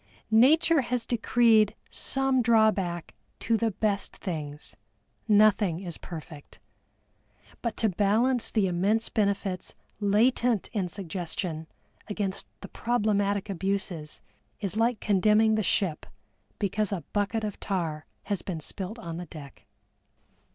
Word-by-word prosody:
Nature 300 Hz, +7 st, +5 dB
has 245 Hz, -1 st, -2 dB
decreed 230 Hz, -2 st, +3 dB, 0.2 s
some 270 Hz, -1 st, +2 dB
drawback 215 Hz, -7 st, +2 dB, 0.3 s
to 230 Hz, -, +1 dB
the 225 Hz, 0 st, +1 dB
best 205 Hz, 0 st, -1 dB
things; 150 Hz, -5 st, -6 dB, 0.5 s
nothing 205 Hz, -5 st, +4 dB
is 175 Hz, -4 st, -7 dB
perfect. 155 Hz, -3 st, -10 dB, 1.0 s
But 235 Hz, -3 st, -3 dB
to 220 Hz, -, +3 dB
balance 220 Hz, +6 st, +2 dB
the 215 Hz, -4 st, +2 dB
immense 195 Hz, +5 st, +1 dB
benefits 200 Hz, -3 st, -1 dB, 0.2 s
latent 220 Hz, +2 st, +2 dB
in 200 Hz, -5 st, 0 dB
suggestion 170 Hz, -2 st, -4 dB, 0.4 s
against 205 Hz, -2 st, -3 dB
the -, -, -7 dB
problematic 205 Hz, -4 st, 0 dB
abuses 190 Hz, -4 st, -3 dB, 0.4 s
is 200 Hz, -1 st, -3 dB
like 230 Hz, 0 st, +1 dB
condemning 215 Hz, +2 st, +4 dB
the 215 Hz, -, +2 dB
ship 185 Hz, -4 st, 0 dB, 0.5 s
because 210 Hz, 0 st, -1 dB
a 185 Hz, -6 st, -3 dB
bucket 210 Hz, +2 st, 0 dB
of 210 Hz, -2 st, -4 dB
tar 165 Hz, -6 st, -3 dB, 0.2 s
has 200 Hz, -4 st, -2 dB
been 175 Hz, -4 st, -4 dB
spilt 190 Hz, +7 st, -5 dB
on 170 Hz, -8 st, -6 dB
the 175 Hz, 0 st, -6 dB
deck. 145 Hz, -3 st, -12 dB
205 Hz, 120 wpm, -27 LUFS, 180-220 Hz, 1.0 s, Nature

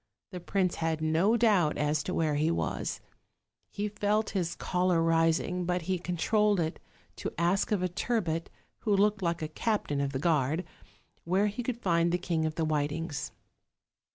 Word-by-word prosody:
The 180 Hz, -, -5 dB
prince 185 Hz, 0 st, 0 dB
had 160 Hz, -1 st, -1 dB
no 165 Hz, +8 st, +2 dB
doubt 205 Hz, -9 st, +3 dB
as 150 Hz, +1 st, +1 dB
to 180 Hz, -, -4 dB
where 155 Hz, -2 st, +1 dB
he 150 Hz, +2 st, +1 dB
was: 170 Hz, -, -2 dB, 0.7 s
he 205 Hz, +1 st, -3 dB
felt 210 Hz, +1 st, 0 dB
his 175 Hz, -4 st, -1 dB
choler 180 Hz, -1 st, +1 dB
rising, 165 Hz, +2 st, +2 dB
but 180 Hz, 0 st, -1 dB
he 185 Hz, +1 st, -1 dB
controlled 205 Hz, +4 st, +1 dB
it 160 Hz, -1 st, -2 dB, 0.4 s
to -, -, -4 dB
ask 175 Hz, +6 st, +1 dB
of 200 Hz, -4 st, +1 dB
a -, -, +2 dB
turbot, 175 Hz, -3 st, -1 dB, 0.3 s
who 205 Hz, -2 st, +1 dB
looked 205 Hz, 0 st, +2 dB
like 170 Hz, -2 st, -1 dB
a -, -, -1 dB
captain 155 Hz, -4 st, -1 dB
of 140 Hz, -1 st, -1 dB
the 135 Hz, -, -2 dB
guard, 155 Hz, +2 st, +1 dB, 0.6 s
where 190 Hz, +4 st, +2 dB
he 210 Hz, +4 st, -2 dB
could 240 Hz, 0 st, -4 dB
find 170 Hz, -2 st, +2 dB
the 175 Hz, -, +2 dB
King 170 Hz, -3 st, -1 dB
of 155 Hz, -, -4 dB
the 165 Hz, -, 0 dB
Whitings. 150 Hz, 0 st, -2 dB
175 Hz, 175 wpm, -29 LUFS, 160-200 Hz, 0.7 s, doubt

